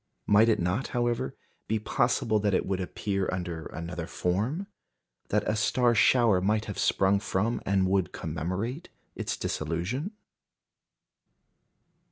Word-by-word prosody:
Might 110 +3 +5
it 110 - +3
not, 90 +9 0
however, 120 -1 0 0.3
be 110 - +1
possible 110 0 +1
that 100 -2 +1
it - - +1
would 95 -1 -1
appear 95 +1 -2
under 85 -3 -4
another 85 0 -5
form 105 - -1 0.6
that 105 0 +1
a 110 - +1
star 120 +3 +3
shower 115 -4 +4
might 105 +3 +1
have 105 - -5
sprung 100 +1 +3
from 105 +4 -1
and 95 -1 +3
would 95 -1 +1
commemorate 95 - -4 0.3
its - - -3
dissolution? 90 - -2
100 Hz, 130 wpm, -28 LUFS, 90-115 Hz, 0.6 s, Might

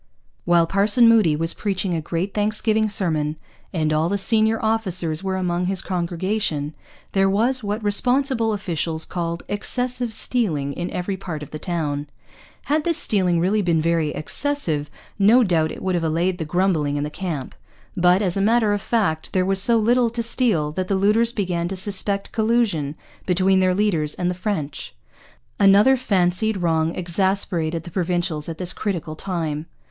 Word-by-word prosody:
While 175 -1 +4
Parson 205 +6 +4
Moody 215 -9 +5
was 165 +2 0
preaching 195 -3 -2
a 165 - -1
great 170 +5 -3
thanksgiving 215 +1 +1
sermon, 155 -7 0 0.4
and 155 -3 0
all 155 +2 +1
the 200 - 0
senior 220 +2 +2
officers 185 -7 -1
were 190 -1 -1
among 180 -1 -1
his 190 -1 0
congregation, 175 -3 -2 0.4
there 195 0 +2
was 235 +6 +2
what 210 +2 -3
responsible 245 +2 +2
officials 165 -5 -3
called 170 -1 -4
'excessive 245 +3 -2
stealing 165 - -1
in 175 +3 -4
every 190 +2 -3
part 160 -5 -6
of 150 - -11
the 155 - -6
Towne.' 150 -4 -3 0.6
Had 300 +1 0
this 335 -1 +1
stealing 185 - +2
really 195 +5 +1
been 170 -4 +1
very 165 -1 +1
'excessive' 155 - -2 0.3
no 225 +6 +6
doubt 165 -6 +1
it - - -8
would 190 - 0
have 175 -2 0
allayed 170 +3 0
the 160 - -3
grumbling 160 -4 0
in 145 - -1
the 150 - -4
camp. 160 -7 -5 0.4
But, 180 +2 +3
as 180 -3 0
a 195 - 0
matter 220 0 +3
of 205 - -2
fact, 195 -10 -1
there 185 -1 +2
was 195 0 +2
so 230 +3 +4
little 235 +2 +3
to 235 0 -3
steal 220 - +1
that 185 +4 -3
the 195 - 0
looters 210 +4 +3
began 180 -6 -2
to 195 - -4
suspect 200 +1 -1
collusion 215 -10 0 0.3
between 190 +1 +3
their 185 -1 +2
leaders 170 -8 0
and 180 0 -1
the - - -2
French. 180 -5 -4 0.6
Another 205 +6 +6
fancied 205 -2 0
wrong 165 -2 0
exasperated 175 -3 -1
the 175 - -10
Provincials 175 -3 -1
at 165 - -6
this 180 0 -2
critical 175 -7 -3
time. 160 -4 -3
185 Hz, 170 wpm, -22 LUFS, 165-210 Hz, 0.6 s, no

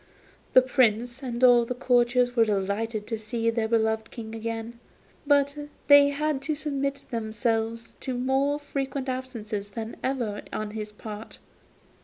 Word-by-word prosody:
The 255 - +8
Prince 245 -1 +2
and 245 -2 -4
all 245 -1 +7
the 245 +2 -4
courtiers 245 -1 +2
were 230 - +6
delighted 210 +2 -1
to 225 -1 -4
see 230 +1 -1
their 225 -1 0
beloved 220 0 +1
King 220 -2 -8
again, 225 +1 -5 0.5
but 285 0 +3 0.3
they 285 0 +8
had 290 -1 -1
to 310 +2 -2
submit 280 -2 -2
themselves 225 0 -2
to 260 -2 -3
more 270 +3 +1
frequent 275 -2 -4
absences 230 -6 -4
than 220 +2 -6
ever 240 -6 -1
on 215 -1 -3
his 210 -1 -5
part. 210 +1 -9
235 Hz, 145 wpm, -26 LUFS, 220-265 Hz, 0.5 s, The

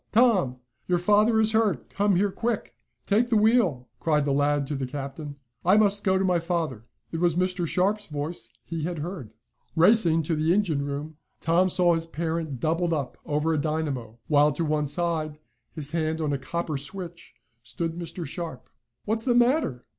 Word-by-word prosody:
Tom! 210 - +3 0.3
Your 180 - +2
father 210 +5 +3
is 220 0 +3
hurt! 220 -2 +1
Come 200 -1 +2
here, 200 +2 +2
quick!" 230 +2 -3 0.3
"Take 225 +4 +2
the 225 - +3
wheel!" 210 - +3
cried 150 -3 +1
the 145 - 0
lad 145 0 +2
to 145 - -3
the 135 -1 -3
captain. 140 +2 -6 0.3
"I 185 +4 +5
must 205 -1 +3
go 190 -1 +3
to 190 - +1
my 180 -2 +2
father." 165 - -2 0.3
It 165 - -3
was 175 -2 +2
Mr. 180 -1 0
Sharp's 200 +5 0
voice 150 +2 -5 0.2
he 165 -1 -4
had 170 +2 -3
heard. 155 - -5 0.5
Racing 170 -2 +5
to 160 +2 -1
the 160 +3 +2
engine 165 -9 +1
room, 145 +2 -5 0.2
Tom 175 +3 +2
saw 175 -1 +4
his 165 0 -1
parent 160 -4 -3
doubled 165 +4 0
up 140 -5 -3
over 150 +2 +1
a 150 - +1
dynamo, 140 -7 -3
while 150 0 +4
to 165 +3 -2
one 150 -1 0
side, 155 0 -1 0.3
his 150 -2 -4
hand 160 -1 -1
on 150 -2 0
a 140 - -1
copper 160 +2 -3
switch, 175 +3 -8 0.3
stood 165 +7 -4
Mr. 170 0 -6
Sharp. 160 -1 -6 0.3
"What's 220 +1 +1
the 245 -2 +3
matter?" 240 - +2
165 Hz, 185 wpm, -26 LUFS, 150-190 Hz, 0.5 s, I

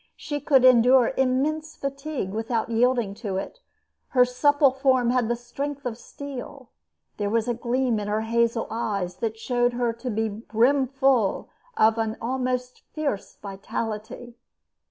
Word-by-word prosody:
She 290 -1 -4
could 265 -2 +4
endure 250 0 +6
immense 295 +4 0
fatigue 275 -6 -4
without 225 +2 -2
yielding 240 -3 +2
to 200 -5 -2
it. 195 - -6 0.5
Her 250 -2 +4
supple 285 +2 +3
form 260 -2 +2
had 250 -2 +1
the 240 - 0
strength 275 +4 -6
of 240 -3 -2
steel. 270 0 -9 0.5
There 205 -1 -1
was 225 +1 0
a 240 - +1
gleam 240 0 0
in 205 - -4
her 210 +1 0
hazel 230 +1 +1
eyes 200 -5 -2
that 225 +2 -3
showed 245 +1 0
her 240 -1 0
to 235 +2 -6
be 220 0 0
brimful 250 +2 +1 0.3
of 220 +1 +4
an 225 0 -1
almost 250 +1 -2
fierce 285 -10 -3
vitality. 220 +4 -6
240 Hz, 145 wpm, -25 LUFS, 225-265 Hz, 0.5 s, endure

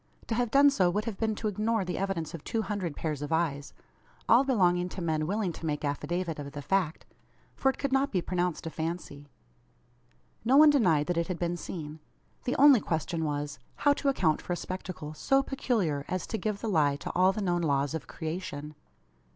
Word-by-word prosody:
To - - -2
have 240 0 0
done 280 +4 +6
so 185 -10 +3
would 210 +4 -1
have 225 -4 -5
been 220 -1 0
to 215 - -3
ignore 215 0 0
the 180 - -3
evidence 190 -5 -2
of 165 - -7
two 225 -1 -1
hundred 190 -8 -3
pairs 155 -3 -3
of 145 - -5
eyes, 155 -4 0 0.6
all 235 +4 +6
belonging 180 -9 +2
to 190 - -7
men 155 -3 -1
willing 200 -1 0
to 165 - -8
make 150 -1 -2
affidavit 160 +3 -2
of 140 -1 -7
the 145 - -5
fact 185 -3 0 0.5
for 270 - +2
it 265 - -2
could 280 - -2
not 270 +1 +2
be 185 - +1
pronounced 175 -1 -2
a 165 - -4
fancy. 160 -3 -5 1.1
No 255 +5 +4
one 305 0 +9
denied 170 - +3
that 175 0 -1
it 170 - 0
had 180 - -3
been 175 0 -1
seen. 160 -3 -7 0.5
The 250 - 0
only 280 -2 +7
question 165 -2 -2
was, 145 -1 -3 0.2
how 285 - +3
to 280 - 0
account 165 - +1
for 175 - -3
a - - 0
spectacle 180 -5 -6
so 270 - +2
peculiar, 215 - -1
as 185 0 -2
to 225 - -3
give 210 -2 -2
the 230 - -3
lie 150 -8 +3
to 145 - -6
all 185 +1 +4
the 195 - -5
known 175 -2 +1
laws 140 -2 +1
of 160 - -5
creation. 155 -3 -5
180 Hz, 210 wpm, -29 LUFS, 155-220 Hz, 1.1 s, one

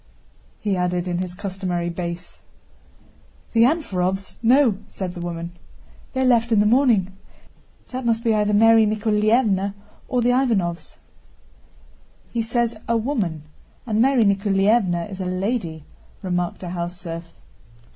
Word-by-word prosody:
he 205 -2 -1
added 180 0 -1
in 175 -1 -1
his 180 -1 -4
customary 185 -3 -3
bass. 170 0 -6 1.1
"The 230 - +4
Anférovs? 195 - 0
No," 240 -3 +4
said 185 -2 -5
the 175 - -7
woman. 170 0 -5 0.6
"They 260 - -1
left 240 -2 +3
in 220 - +4
the 205 - +4
morning. 215 -6 +3 0.7
That 255 0 -5
must 230 -1 0
be 230 -2 +2
either 210 -1 +1
Mary 225 +1 +6
Nikoláevna's 210 -1 +1 0.3
or 250 -3 0
the 245 - +3
Ivánovs'!" 215 -10 0 1.3
"He 235 - -1
says 235 0 0
'a 230 - +2
woman,' 215 - -2 0.4
and 220 -2 +1
Mary 260 -2 +4
Nikoláevna 195 -2 +2
is 195 -2 -7
a - - -3
lady," 185 - -2 0.4
remarked 180 -1 -2
a 180 - -5
house 175 0 -4
serf. 170 -1 -7
200 Hz, 135 wpm, -22 LUFS, 180-230 Hz, 1.3 s, Mary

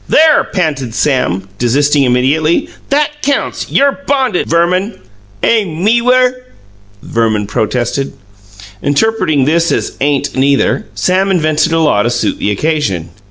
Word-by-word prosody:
"There!" 310 -1 +4
panted 145 - -2
Sam, 100 -11 0
desisting 140 +4 +2
immediately. 140 +7 +1 0.2
"That 295 +1 0
counts! 280 0 -2
You're 280 0 +2
bonded, 260 -8 0
Verman." 180 +5 +1 0.5
"Aim 190 -7 0
meewer!" 250 +3 +2 0.6
Verman 110 -3 0
protested. 120 +6 -2 0.7
Interpreting 150 -2 +1
this 165 +3 +1
as - - -1
"Ain't 145 0 0
neither", 140 +10 +1
Sam 190 +2 +1
invented 155 -4 +1
a 165 - +2
law 150 -10 +2
to 120 - 0
suit 120 0 -1
the - - -1
occasion. 105 - -1
155 Hz, 120 wpm, -13 LUFS, 130-210 Hz, 0.7 s, There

